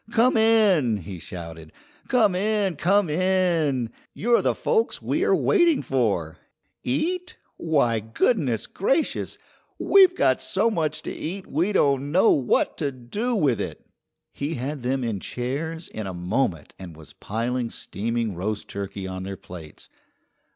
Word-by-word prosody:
"Come 235 +3 +3
in!" 210 - +4
he 95 -1 -8
shouted. 80 -2 -9 0.4
"Come 220 -6 +3
in! 200 -1 0
Come 195 +6 +2
in! 165 -7 +1 0.2
You're 235 +2 +3
the - - +1
folks 455 -1 0
we - - -1
are - - +4
waiting 345 -7 +3
for! 100 -12 0 0.5
Eat? 360 - -2 0.2
Why, 140 -9 +1
goodness 115 - 0
gra 270 - +1
cious! - - -6 0.4
We've 380 -2 +5
got 130 - +2
so 215 +4 +1
much 155 -5 -2
to - - -4
eat 185 +4 -5
we 170 +8 0
don't 140 -6 +2
know 185 +7 +5
what 130 -4 +1
to 145 -3 -1
do 205 - -3
with 145 - +2
it." - - -6 0.5
He 145 +3 -3
had 140 +3 -4
them 130 +2 -1
in 110 -4 -2
chairs 150 - -4
in 110 -2 -6
a 95 - -5
moment 90 - -1
and 90 -4 -9
was 80 -2 -14
piling 120 +3 -2
steaming 115 0 -3
roast 105 +4 -4
turkey 100 0 -5
on 95 0 -5
their 95 +1 -6
plates. 85 -4 -11
140 Hz, 150 wpm, -24 LUFS, -, 0.5 s, We've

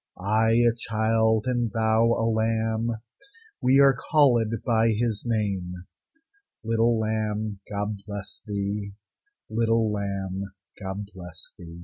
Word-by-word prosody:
I 110 +4 +2
a 120 0 +4
child, 110 -1 +1
and 120 -2 0
thou 110 +1 +2
a 115 - 0
lamb, 110 0 0 0.7
We 130 +2 +4
are 135 -1 +6 0.2
callèd 120 -8 +3
by 115 -2 +3
His 110 -1 -1
name. 100 -6 -1 0.9
Little 115 +1 +2
lamb, 110 -1 -2
God 105 0 -3
bless 100 -1 -7
thee! 100 0 -3 0.5
Little 115 0 +1
lamb, 100 -1 -3 0.3
God 100 +1 -5
bless 90 -3 -9
thee! 85 -1 -10
110 Hz, 115 wpm, -26 LUFS, 100-115 Hz, 0.9 s, are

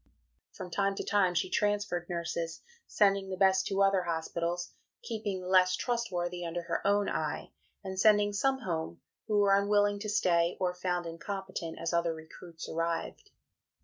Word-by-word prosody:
From 180 - -8
time 195 +2 +1
to - - -3
time 190 -3 +2
she - - +1
transferred 205 -4 0
nurses, 170 -1 -3 0.3
sending 195 -2 +2
the 185 - -4
best 190 0 +4
to 195 0 +2
other 195 -1 +3
hospitals, 170 +1 -3 0.3
keeping 210 -4 -3
the 180 - -7
less 185 0 +5
trustworthy 180 -8 -2
under 170 +1 -3
her - - -2
own 205 0 +3
eye; - - -3 0.3
and 190 -1 -5
sending 205 0 +5
some 265 +5 +1
home, 165 -7 -3 0.3
who 210 -2 +1
were 200 -1 +5
unwilling 205 0 +2
to 215 +1 -4
stay 175 -4 +2
or 180 -1 0
found 180 -1 -2
incompetent, 170 0 -5
as 165 +1 -3
other 170 -1 +1
recruits 160 +1 -10
arrived. 165 0 -3
185 Hz, 160 wpm, -31 LUFS, 170-205 Hz, 0.3 s, less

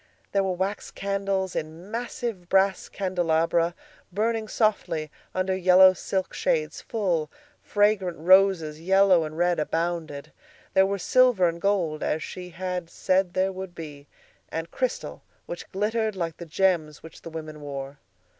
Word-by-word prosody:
There 195 -1 +2
were 190 -1 0
wax 190 +3 -3
candles, 195 -1 -2
in 160 +6 -6
massive 230 -5 -4
brass 195 0 +2
candelabra, 170 -2 +1 0.4
burning 220 +3 0
softly 165 -9 0 0.2
under 185 0 0
yellow 185 0 +7
silk 190 +1 -3
shades; - - -1
full, 180 - -1 0.3
fragrant 205 -4 +1
roses, 175 -3 +4
yellow 190 -1 +4
and 155 +1 -7
red, 175 0 +2
abounded. 160 -2 -2 0.4
There 190 0 +5
were 200 0 -1
silver 240 -1 +4
and 170 0 -3
gold, 180 -7 0
as 155 - -1
she 180 -1 -7
had 180 0 -4
said 185 0 0
there 190 +1 +2
would 190 -1 -7
be, 145 -3 -9 0.4
and 165 +1 -5
crystal 255 -1 -3 0.2
which 175 - -8
glittered 215 +2 0
like 165 -3 -3
the 170 - -8
gems 160 -3 0
which 160 - -12
the - - -8
women 155 -2 -7
wore. 140 -1 -6
185 Hz, 145 wpm, -26 LUFS, 165-195 Hz, 0.4 s, yellow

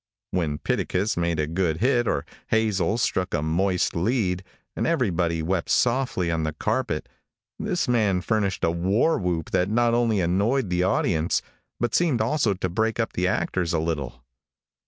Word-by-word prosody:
When 80 -5 -1
Pitticus 95 +7 -1
made 85 -2 0
a 75 - +2
good 80 0 -1
hit, 120 +2 +2
or 70 - 0 0.2
Hazel 110 -3 +1
struck 95 -6 0
a 75 - -1
moist 90 +3 +1
lead, 95 -1 0 0.3
and - - -1
everybody 90 - 0
wept 90 +1 -1
softly 120 -9 +1
on 80 -1 0
the 80 -1 -2
carpet, 75 - -2 0.5
this 190 -4 -1
man 105 -7 +2
furnished 100 -2 -1
a 85 - +3
war 95 - +1
whoop 85 -4 -2
that 90 +2 +1
not 120 +2 +2
only 115 -3 +2
annoyed 100 +6 +1
the 90 0 +1
audience, 90 -3 +1 0.4
but 120 - -1
seemed 160 -9 +2
also 115 -2 +1
to 90 - -2
break 110 +6 -1
up 115 - -1
the 90 +1 0
actors 90 -2 -1
a 85 - +2
little. 70 -7 -3
95 Hz, 165 wpm, -25 LUFS, 85-115 Hz, 0.5 s, a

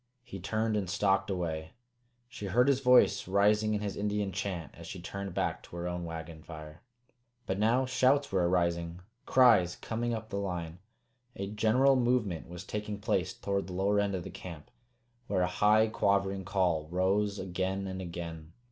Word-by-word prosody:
He 95 - -8
turned 110 +4 -1
and 100 -4 -1
stalked 95 +2 +1
away. 80 -4 -3 0.5
She 120 -5 -7
heard 120 +7 +3
his 140 -2 +3
voice 125 -8 +4
rising 105 +2 +3
in 105 - -2
his 100 -2 -3
Indian 105 -1 -1
chant 95 -4 -4
as 85 0 -11
she 95 - -7
turned 100 +1 -6
back - - -1
to - - -13
her 85 0 -3
own 90 -1 -3
wagon 80 -1 -7
fire. 75 -1 -10 0.6
But 95 +1 -2
now 120 +5 +3
shouts 130 +2 +2
were 90 -2 +2
arising, 85 -1 0 0.3
cries 115 -9 +5
coming 120 +1 -3
up 110 0 -7
the 100 - -2
line. 90 -3 -4 0.6
A 100 - -3
general 115 +6 +4
movement 120 -10 0
was 90 +1 -7
taking 105 +1 -4
place 95 -3 0
toward 100 -1 -2
the 90 - -7
lower 100 +3 +2
end 100 -1 0
of 90 - -4
the - - -8
camp, 85 -5 -9 0.6
where 90 - +1
a - - +2
high 110 +1 +6
quavering 100 -3 0
call 85 -6 +1
rose 100 +3 +1
again 95 +1 -2
and 95 0 -5
again. 85 -2 -7
95 Hz, 175 wpm, -31 LUFS, 90-105 Hz, 0.6 s, high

